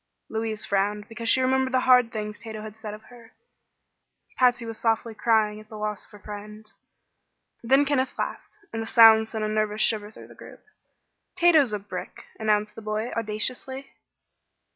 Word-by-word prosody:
Louise 220 Hz, -1 st, -3 dB
frowned 205 Hz, +1 st, -1 dB
because 230 Hz, 0 st, -4 dB
she 260 Hz, -, +5 dB
remembered 260 Hz, 0 st, +1 dB
the 255 Hz, -, +3 dB
hard 250 Hz, -3 st, +5 dB
things 210 Hz, -1 st, -5 dB
Tato 220 Hz, -1 st, -8 dB
had 215 Hz, -1 st, -9 dB
said 215 Hz, -1 st, -7 dB
of 215 Hz, -, -15 dB
her. 235 Hz, -2 st, -16 dB, 1.1 s
Patsy 250 Hz, -2 st, +3 dB
was 225 Hz, -1 st, -7 dB
softly 225 Hz, 0 st, 0 dB
crying 215 Hz, -1 st, +1 dB
at 215 Hz, 0 st, -15 dB
the 215 Hz, -, -9 dB
loss 210 Hz, -1 st, -4 dB
of -, -, -26 dB
her -, -, -11 dB
friend. 210 Hz, +1 st, -10 dB, 1.0 s
Then 270 Hz, +4 st, +3 dB
Kenneth 270 Hz, -2 st, -1 dB
laughed, -, -, -5 dB, 0.2 s
and 225 Hz, -, -3 dB
the 225 Hz, -, -5 dB
sound 225 Hz, -2 st, +7 dB
sent 220 Hz, -1 st, -4 dB
a -, -, 0 dB
nervous 215 Hz, 0 st, 0 dB
shiver 210 Hz, -2 st, 0 dB
through 215 Hz, -, -14 dB
the -, -, -13 dB
group. -, -, -14 dB, 0.7 s
"Tato's 335 Hz, -8 st, +4 dB
a 210 Hz, -, -1 dB
brick!" 195 Hz, -2 st, -8 dB
announced 210 Hz, -1 st, +1 dB
the -, -, -10 dB
boy, 215 Hz, +2 st, -3 dB
audaciously. 240 Hz, +5 st, -3 dB
220 Hz, 175 wpm, -25 LUFS, 210-240 Hz, 1.1 s, sound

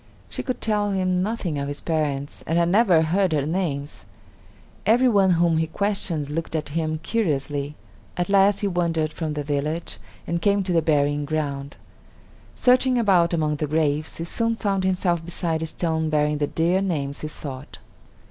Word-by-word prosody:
She -, -, -4 dB
could 255 Hz, -, -4 dB
tell 210 Hz, -2 st, +1 dB
him 185 Hz, -2 st, 0 dB
nothing 190 Hz, -7 st, -2 dB
of 140 Hz, -, -3 dB
his 145 Hz, 0 st, -4 dB
parents, 145 Hz, -4 st, -2 dB
and 165 Hz, -, +1 dB
had 170 Hz, 0 st, +3 dB
never 185 Hz, -5 st, +4 dB
heard 185 Hz, +4 st, +2 dB
their 150 Hz, -4 st, 0 dB
names. 155 Hz, -4 st, -3 dB, 0.8 s
Every 245 Hz, +4 st, +4 dB
one 195 Hz, -5 st, +4 dB
whom 170 Hz, -1 st, +2 dB
he 160 Hz, -, 0 dB
questioned 180 Hz, -5 st, -1 dB
looked 165 Hz, +1 st, -3 dB
at 155 Hz, -, -2 dB
him 155 Hz, 0 st, -2 dB
curiously. 145 Hz, -8 st, -1 dB, 0.4 s
At 175 Hz, -1 st, 0 dB
last 200 Hz, 0 st, +4 dB
he 205 Hz, -, +1 dB
wandered 165 Hz, -4 st, 0 dB
from 155 Hz, -3 st, -3 dB
the 145 Hz, -, -2 dB
village 150 Hz, +3 st, -3 dB, 0.3 s
and 170 Hz, 0 st, -2 dB
came 200 Hz, 0 st, +2 dB
to 185 Hz, -1 st, -1 dB
the 165 Hz, -, +4 dB
burying 145 Hz, -2 st, +1 dB
ground. 145 Hz, -2 st, -3 dB, 0.8 s
Searching 255 Hz, 0 st, +4 dB
about 185 Hz, -7 st, +3 dB
among 155 Hz, -3 st, 0 dB
the 150 Hz, -, -2 dB
graves, 155 Hz, 0 st, 0 dB
he 165 Hz, -, -4 dB
soon 230 Hz, +6 st, -1 dB
found 195 Hz, -3 st, -1 dB
himself 180 Hz, -3 st, +1 dB
beside 165 Hz, -1 st, -2 dB
a 160 Hz, -, -2 dB
stone 160 Hz, -1 st, -1 dB
bearing 150 Hz, -1 st, +1 dB
the 145 Hz, -, +1 dB
dear 175 Hz, +5 st, +1 dB
names 145 Hz, -7 st, -2 dB
he 155 Hz, -, -3 dB
sought. 140 Hz, -2 st, -8 dB
165 Hz, 175 wpm, -23 LUFS, 150-190 Hz, 0.8 s, never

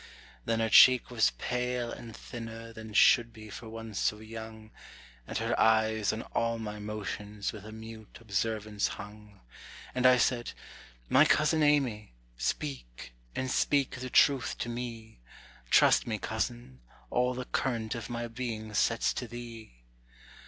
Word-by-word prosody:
Then 115 Hz, 0 st, 0 dB
her 110 Hz, -, +1 dB
cheek 125 Hz, +4 st, +7 dB
was 115 Hz, -3 st, +3 dB
pale 125 Hz, -1 st, -2 dB
and 115 Hz, -2 st, -9 dB
thinner 115 Hz, -1 st, -8 dB
than 110 Hz, -1 st, -9 dB
should 115 Hz, +2 st, +5 dB
be 110 Hz, -1 st, -12 dB
for 115 Hz, 0 st, -8 dB
one 115 Hz, 0 st, -8 dB
so 105 Hz, +1 st, 0 dB
young, 110 Hz, 0 st, -9 dB, 0.6 s
And -, -, -3 dB
her -, -, -1 dB
eyes 110 Hz, -1 st, +3 dB
on 110 Hz, +1 st, -4 dB
all 115 Hz, 0 st, -1 dB
my 105 Hz, -2 st, -6 dB
motions 105 Hz, -1 st, -5 dB
with 105 Hz, -1 st, -10 dB
a -, -, -8 dB
mute 110 Hz, 0 st, -10 dB
observance 110 Hz, -1 st, -1 dB
hung. 105 Hz, 0 st, -12 dB, 0.5 s
And 130 Hz, 0 st, +4 dB
I 125 Hz, 0 st, +6 dB
said, 120 Hz, -1 st, 0 dB, 0.5 s
"My -, -, +6 dB
cousin 155 Hz, +1 st, +3 dB
Amy, 130 Hz, -, +1 dB, 0.2 s
speak, -, -, -4 dB, 0.2 s
and 130 Hz, 0 st, -2 dB
speak 140 Hz, -3 st, +1 dB
the 130 Hz, 0 st, -5 dB
truth 135 Hz, 0 st, +3 dB
to 120 Hz, -, -3 dB
me; 115 Hz, -, -6 dB, 0.5 s
Trust -, -, +5 dB
me, -, -, -1 dB
cousin, 60 Hz, +1 st, -4 dB, 0.3 s
all 125 Hz, +1 st, +1 dB
the 130 Hz, 0 st, -4 dB
current 115 Hz, -5 st, -1 dB
of 115 Hz, -3 st, -6 dB
my 120 Hz, 0 st, -3 dB
being 115 Hz, -2 st, -5 dB
sets 115 Hz, +2 st, +2 dB
to 125 Hz, -, -4 dB
thee." 115 Hz, -, -10 dB
115 Hz, 150 wpm, -30 LUFS, 105-120 Hz, 0.6 s, cheek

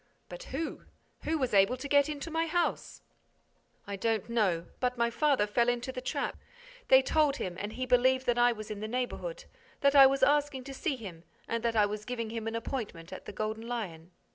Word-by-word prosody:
"But -, -, -8 dB
who? 315 Hz, -, -5 dB, 0.4 s
Who 320 Hz, +1 st, +1 dB
was 260 Hz, -6 st, -1 dB
able 200 Hz, +5 st, +4 dB
to 270 Hz, +3 st, -6 dB
get 285 Hz, +1 st, +4 dB
into 300 Hz, +2 st, -5 dB
my 325 Hz, +1 st, 0 dB
house?" 345 Hz, +1 st, -1 dB, 0.8 s
"I 200 Hz, -, -4 dB
don't 225 Hz, 0 st, 0 dB
know, 190 Hz, -8 st, +1 dB
but 250 Hz, -1 st, 0 dB
my 235 Hz, 0 st, +1 dB
father 280 Hz, -4 st, +2 dB
fell 235 Hz, +3 st, +2 dB
into 245 Hz, +2 st, -1 dB
the 255 Hz, -1 st, -6 dB
trap. -, -, -3 dB, 0.5 s
They 265 Hz, 0 st, +7 dB
told 300 Hz, 0 st, +2 dB
him 185 Hz, -10 st, -4 dB
and 205 Hz, +2 st, -4 dB
he 255 Hz, +3 st, -3 dB
believed 255 Hz, +1 st, +3 dB
that 240 Hz, 0 st, +1 dB
I 240 Hz, 0 st, +5 dB
was 215 Hz, -2 st, -7 dB
in 210 Hz, -, -5 dB
the 215 Hz, -, -4 dB
neighborhood, 255 Hz, -, -4 dB, 0.4 s
that 280 Hz, 0 st, +4 dB
I 275 Hz, -1 st, +10 dB
was 270 Hz, 0 st, 0 dB
asking 290 Hz, -1 st, +2 dB
to 270 Hz, +1 st, -8 dB
see 290 Hz, +1 st, -2 dB
him 185 Hz, -9 st, -9 dB, 0.2 s
and 230 Hz, 0 st, -1 dB
that 230 Hz, -1 st, 0 dB
I 210 Hz, -1 st, +5 dB
was 210 Hz, +1 st, -4 dB
giving 230 Hz, -2 st, -4 dB
him 225 Hz, -1 st, -4 dB
an 225 Hz, -, -3 dB
appointment 220 Hz, -8 st, -5 dB
at -, -, -9 dB
the -, -, -6 dB
Golden 215 Hz, +3 st, -4 dB
Lion." 180 Hz, -9 st, -5 dB
245 Hz, 215 wpm, -30 LUFS, 215-275 Hz, 0.8 s, I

